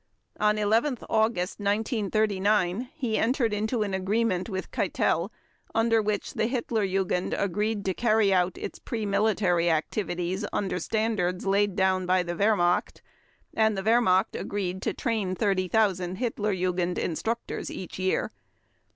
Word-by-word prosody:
On 210 0 +3
11 225 +6 +2
August 220 -4 +1
1939 210 0 +1
he 230 -5 -1
entered 235 -2 +1
into 215 +2 0
an 200 -2 -3
agreement 190 0 0
with 190 -2 -5
Keitel - - 0 0.5
under 225 0 +3
which 210 -1 -2
the 220 - 0
Hitler 235 -3 -1
Jugend 185 -1 0
agreed 205 +2 -1
to 190 - +1
carry 215 -2 +3
out 180 -1 +1
its - - -6
pre 225 -2 -4
military 200 -4 +2
activities 175 +3 -1
under 190 -3 -1
standards 210 -5 -1
laid 200 0 +2
down 190 -2 +1
by 185 0 +3
the 175 0 -4
Wehrmacht 175 -2 +1 0.5
and 220 -2 +2
the 190 - -2
Wehrmacht 220 -4 +3
agreed 190 -2 -3
to - - -1
train 215 -6 -1
30,000 185 -2 +1
Hitler 215 -2 -1
Jugend 180 -1 -1
instructors 225 +8 -3
each 185 0 -7
year. 185 0 0
205 Hz, 135 wpm, -27 LUFS, 185-220 Hz, 0.5 s, On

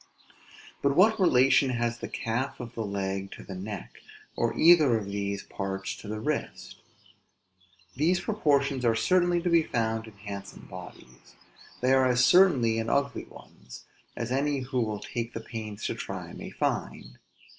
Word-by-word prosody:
But 140 0 +2
what 220 +5 +5
relation 135 -5 +4
has 120 -1 -1
the - - -5
calf 120 +4 -3
of 120 -1 -7
the 115 - -3
leg 100 -1 -3
to - - -11
the 95 - -8
neck; 95 +1 -7 0.4
or - - -1
either 155 -8 +6
of 105 - -4
these 100 0 -3
parts 95 0 -4
to - - -11
the 105 +1 -4
wrist? 150 +6 -4 1.1
These 165 +7 +2
proportions 140 - +1
are 115 -2 +3
certainly 175 +4 +2
to 180 - +1
be 170 -1 +6
found 115 -5 -2
in 110 - -12
handsome 100 -1 -9
bodies. 90 -9 -12 0.5
They 130 +1 +4
are 130 -1 +4
as 125 0 +4
certainly 130 -12 +5
in 115 0 -2
ugly 140 0 0
ones; - - -14 0.3
as 115 +1 -4
any 140 +1 0
who 125 0 -1
will 110 -2 -2
take 120 0 -4
the - - -2
pains 110 -2 -7
to - - -1
try - - -6
may - - -8
find. - - -3
120 Hz, 165 wpm, -28 LUFS, 105-140 Hz, 1.1 s, either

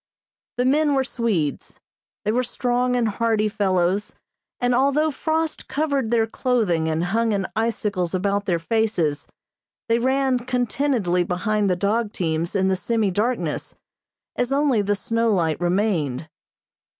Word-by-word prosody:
The 250 - +1
men 290 +2 +3
were 265 - +2
Swedes. 210 - -2 0.5
They 210 - +2
were 245 +3 +2
strong 250 0 0
and 240 -2 +2
hardy 220 0 +1
fellows, 195 -2 0 0.4
and 245 -1 +1
although 280 +5 +2
frost 320 +2 -2
covered 280 -5 -1
their 230 -1 +3
clothing 220 -9 0
and 160 +1 0
hung 220 +5 +1
in 195 -1 0
icicles 210 -5 -1
about 200 +2 0
their 175 -3 +2
faces, 170 -5 0 0.6
they 230 0 +2
ran 265 +1 +1
contentedly 245 -6 0
behind 205 +3 0
the 180 - +2
dog 210 +4 0
teams 165 +1 -2
in 190 -1 +2
the 190 - +2
semi 215 +1 0
darkness, 230 +7 -2 0.6
as 245 +1 -1
only 275 -5 +2
the 205 0 0
snow 230 +2 0
light 165 -5 0
remained. 175 - 0
220 Hz, 140 wpm, -23 LUFS, 185-250 Hz, 0.6 s, men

